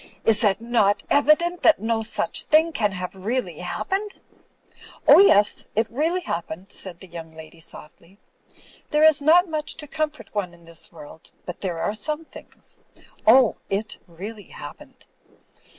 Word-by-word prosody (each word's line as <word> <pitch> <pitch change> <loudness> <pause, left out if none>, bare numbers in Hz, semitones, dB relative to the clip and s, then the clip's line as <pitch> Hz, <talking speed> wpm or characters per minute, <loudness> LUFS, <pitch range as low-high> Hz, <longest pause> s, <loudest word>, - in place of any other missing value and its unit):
"Is 220 0 +4
it 200 -2 +3
not 225 -4 +1
evident 325 +5 +3
that 320 - +5
no 225 0 -1
such 220 - +1
thing 320 +1 +4
can 210 -9 0
have 180 0 -6
really 230 +7 -3
happened?" 400 +2 -3 0.9
"Oh, - - +9
yes 210 - +4
— - - -28
^it 225 - +3
really 325 +8 0
happened," 175 - -6
said 180 -3 -6
the 190 - -11
yoimg 165 -2 -10
lady, 160 +1 -12
softly. 165 +3 -12 0.7
"There 300 0 +2
is 315 -2 +6
not 340 +5 +5
much 310 -2 -4
to 300 - -7
comfort 300 -6 -4
one 185 -5 -3
in 170 -1 -18
this 165 -1 -9
world; 160 -1 -12 0.2
but 180 - -7
there 180 -4 -3
are 185 - -1
some 300 +9 -4
things. - - -14 0.5
Oh, 245 0 +6
it 210 +2 -3
really 200 +5 -9
hap - - -10
pened." - - -17
220 Hz, 165 wpm, -23 LUFS, 185-305 Hz, 0.9 s, Oh